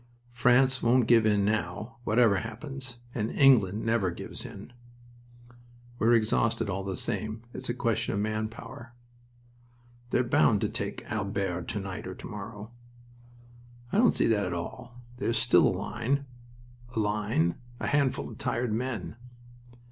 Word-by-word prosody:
"France 130 +2 +3
won't 120 0 +4
give 115 -1 +5
in 105 -2 +3
now, 105 +2 -2
whatever 110 -2 +4
happens. 125 +4 -5 0.2
And 110 -1 -1
England 110 -8 +4
never 110 -4 +2
gives 85 - -7
in." 105 +5 -11 1.3
"We're 115 +2 +5
exhausted, 115 0 +1
all 95 +1 -2
the 95 -1 -4
same. 110 +1 -3
It's - - -6
a 120 - -1
question 115 -3 0
of - - 0
man 110 +1 -1
power." 120 +1 -11 1.1
"They're 125 - +2
bound 115 -3 +3
to 105 - +1
take 100 0 -4
Albert 100 -5 -2
to 105 - -3
night 95 -2 -6
or - - -6
to - - -10
morrow." 105 +1 -8 1.2
"I 205 - +2
don't 240 -1 +5
see - - +2
that 105 -4 +2
at 90 - -3
all. 120 +8 -7 0.2
There's 115 - 0
still 115 -6 +5
a 90 - 0
line..." 115 +8 -1 0.7
"A - - +1
line! 105 -5 +1 0.3
A - - -3
handful 140 -3 +1
of - - -10
tired 120 -2 -1
men." 115 -3 -3
110 Hz, 150 wpm, -28 LUFS, 100-120 Hz, 1.3 s, give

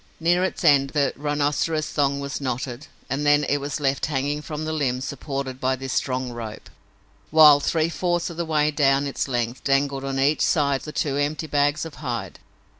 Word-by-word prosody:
Near 175 +2 +2
its 190 - -2
end 140 -1 +5
the 140 -2 +2
rhinoceros 150 +2 0
thong 140 -1 +1
was 140 0 -5
knotted 130 +1 -4 0.2
and 135 +2 -2
then 145 0 +4
it 145 - +1
was 145 +2 -4
left 140 -1 0
hanging 145 0 -1
from 150 +1 -5
the 155 - -2
limb 130 -5 0
supported 135 -1 -5
by 130 +1 +1
this 130 0 -5
strong 130 -1 -1
rope, 115 -3 -8 0.6
while, 150 -2 +8
three 160 +2 +1
fourths 175 0 -1
of 165 - -10
the 170 - -1
way 155 -2 +1
down 140 -1 +2
its 140 - -2
length, 120 -1 -2
dangled 140 0 +1
on 135 0 -3
each 145 +3 +2
side 140 -5 +2
the 150 - -7
two 140 -2 -1
empty 145 +2 -1
bags 145 +1 +1
of 165 - -8
hide. 120 -5 -4
145 Hz, 190 wpm, -23 LUFS, 135-150 Hz, 0.6 s, while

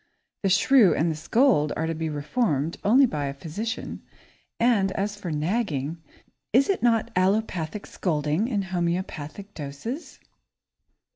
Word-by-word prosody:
The 195 - +1
shrew 200 +2 +5
and 165 +2 +1
the - - -3
scold 195 - +2
are 160 - 0
to 165 - -1
be 160 0 -3
reformed 150 - -1
only 255 +7 +6
by 150 - -2
a 140 0 -4
physician, 200 - -5 0.6
and 215 -5 +3
as 205 +1 -2
for 205 -4 -6
nagging, 160 - -1 0.5
is 260 - +4
it 390 - +1
not 230 -2 +2
allopathic 185 -1 0
scolding 155 +4 -1
in 210 -6 -1
homeopathic 180 0 -3
doses? 155 - -6
185 Hz, 135 wpm, -25 LUFS, 155-220 Hz, 0.6 s, only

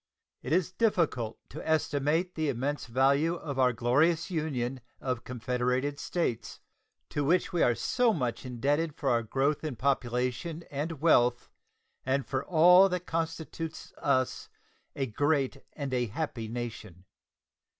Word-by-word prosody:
It 130 - -6
is 180 +2 +2
difficult 170 - 0
to - - -7
estimate 160 +3 +1
the 155 -2 -1
"immense 140 +3 -2
value" 140 +7 +3
of 145 -5 -5
our 130 -1 +5
glorious 145 +10 +2
Union 135 -6 -2 0.2
of 125 -3 -3
confederated 125 +3 -1
States, 120 -11 -2 0.5
to 145 - -1
which 175 +5 +2
we 175 - +1
are 120 - +4
so 245 - +2
much 125 - -2
indebted 145 +5 -1
for 135 -3 0
our 120 -1 +3
growth 135 +7 0
in 155 -5 -3
population 125 +5 -1
and 150 +1 -4
wealth 125 -7 +3 0.5
and 135 +1 0
for 130 -1 -2
all 180 +3 +6
that 180 -1 -3
constitutes 165 0 -4
us 130 -2 0 0.5
a 135 - -1
great 140 +3 0 0.2
and 140 -3 -4
a 125 -1 +1
happy 115 -1 -4
nation. 110 -6 -6
140 Hz, 140 wpm, -29 LUFS, 125-160 Hz, 0.5 s, all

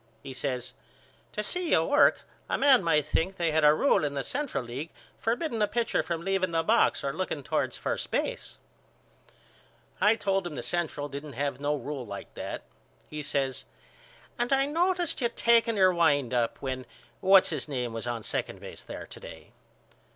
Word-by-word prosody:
He 135 -2 -7
says 125 -1 -3 0.6
To 210 - -2
see 360 +9 -1
you - - +4
work - - +4 0.3
a - - +1
man 270 -5 +5
might 150 -4 +2
think 170 +5 0
they 170 -2 +1
had 160 0 +2
a 150 - +8
rule 155 - +3
in 145 -1 -1
the 140 - -1
Central 280 - -2
League 130 +7 -6 0.3
forbidding 235 0 -1
a 210 - +4
pitcher 235 +1 0
from 165 0 -3
leaving 195 -1 +1
the 165 -1 0
box 225 +7 +3
or - - -1
looking - - -3
toward - - -1
first - - -3
base. - - -3 1.4
I 210 +2 +5
told 195 -4 0
him 155 - -7
the - - -4
Central 160 -4 -2
didn't 140 +1 -7
have 140 +3 -2
no 145 +1 0
rule 145 -2 -5
like 100 -4 -8
that. - - -5 0.5
He 150 0 -4
says 140 -2 -2 0.7
And 240 +2 0
I 270 0 +4
noticed 345 +2 +1
you 235 - +2
taking 230 -1 +3
your 185 -1 +5
wind 145 -7 +2
up 120 -2 0
when 130 -1 -3 0.3
What's 190 0 +6
His 155 -4 -2
Name 125 -5 -3
was 115 +1 -5
on 120 -2 -3
second - - -3
base - - -10
there - - -8
to - - -12
day. - - -11
165 Hz, 185 wpm, -28 LUFS, 140-225 Hz, 1.4 s, a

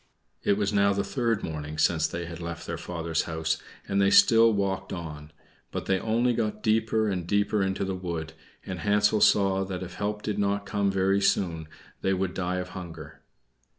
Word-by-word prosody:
It 100 - +2
was 105 0 0
now 100 0 +4
the 100 0 0
third 115 -5 -1
morning 75 -1 -5
since 80 0 +3
they 85 +1 -5
had 85 0 -8
left 85 0 -6
their - - -3
father's 85 -2 -2
house, 80 -1 -1 0.3
and 100 0 +1
they 100 - +4
still 115 +3 +6
walked 95 -2 -1
on; 75 -4 -7 0.4
but - - -5
they 95 -1 +1
only 115 +4 +1
got 105 -2 -2
deeper 110 0 +2
and 90 -4 -2
deeper 105 +1 +1
into 95 0 0
the 95 - -2
wood, 85 -3 -4 0.3
and 95 -2 -5
Hansel 105 +2 +2
saw 95 -1 +4
that 95 -1 -5
if 90 -1 -8
help 105 +3 -3
did 105 -1 -2
not 100 0 0
come 100 0 0
very 95 +1 +2
soon 85 -5 +1 0.3
they 95 0 +1
would 95 -1 -2
die 90 -1 -2
of 90 0 -4
hunger. 90 -3 -9
95 Hz, 190 wpm, -27 LUFS, 85-105 Hz, 0.4 s, still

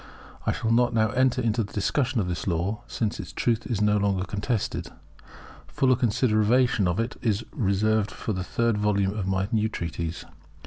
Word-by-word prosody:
I - - +4
shall 115 - -1
not 120 0 +3
now 110 -1 +2
enter 130 0 +2
into 115 0 +1
the 100 - -10
discussion 125 +4 0
of 95 - 0
this 90 +2 -4
law, 95 +6 -1
since 110 -3 -2
its 95 - -6
truth 115 -1 0
is 115 -5 -1
no 105 0 +3
longer 100 -2 +1
contested. 100 +3 -2 0.8
Fuller 130 -1 +2
consideration 120 -2 +2
of 90 +3 0
it 115 +2 -2
is 110 -2 0
reserved 105 0 +1
for 110 - -4
the 95 -1 -3
third 115 +3 0
volume 100 -1 +1
of 100 -3 -3
my 95 0 0
new 110 -1 +1
treatise. 85 -3 -4
105 Hz, 180 wpm, -26 LUFS, 100-115 Hz, 0.8 s, I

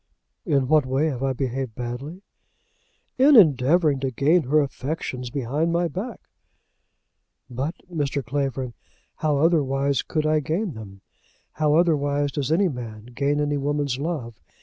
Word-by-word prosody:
"In 140 -3 +2
what 150 -2 +3
way 135 +5 +1
have 130 -4 -5
I 135 -1 0
behaved 130 -2 -3
badly?" 135 +10 -6 1.0
"In 280 +2 +7
endeavouring 150 - +5
to 135 0 -1
gain 145 +8 +3
her 150 +4 +3
affections 130 -3 -4
behind 140 +6 -1
my 170 +1 +1
back." 205 +8 -5 1.3
"But, 135 +7 -3
Mr. 145 -6 -2
Clavering, 135 -1 -2 0.4
how 150 -2 +1
otherwise 140 -3 +2
could 155 -1 -2
I 155 0 +3
gain 165 +5 -2
them? 100 -3 -11 0.5
How 150 -1 +1
otherwise 145 -4 +2
does 140 0 -2
any 190 +4 +3
man 115 -6 -7
gain 140 +3 0
any 145 0 0
woman's 140 -2 -1
love? 140 -8 -4
145 Hz, 140 wpm, -24 LUFS, 130-155 Hz, 1.3 s, In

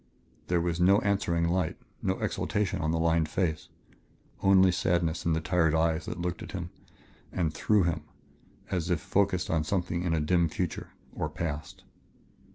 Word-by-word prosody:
There 90 -1 +2
was 85 0 -1
no 95 +3 +6
answering 85 -4 +1
light, 90 -1 0 0.2
no - - 0
exaltation 105 -4 -1
on 80 - 0
the 80 - +1
lined 80 -1 +2
face. 80 -4 -1 0.7
Only 95 -1 +6
sadness 85 -2 0
in 85 - +3
the 80 - 0
tired 80 -2 +2
eyes 80 0 +1
that 90 - -5
looked 90 0 -3
at - - -8
him 90 -2 -5 0.6
and 85 -4 -1
through 105 +2 +3
him 85 -1 0 0.7
as 90 -2 -1
if 90 -3 +1
focused 95 -3 0
upon 80 -1 +1
something 90 0 -1
in 85 -2 0
a - - +1
dim 85 +2 +2
future 90 +1 -3 0.2
or - - -2
past. 80 -2 -5
85 Hz, 165 wpm, -29 LUFS, 80-90 Hz, 0.7 s, no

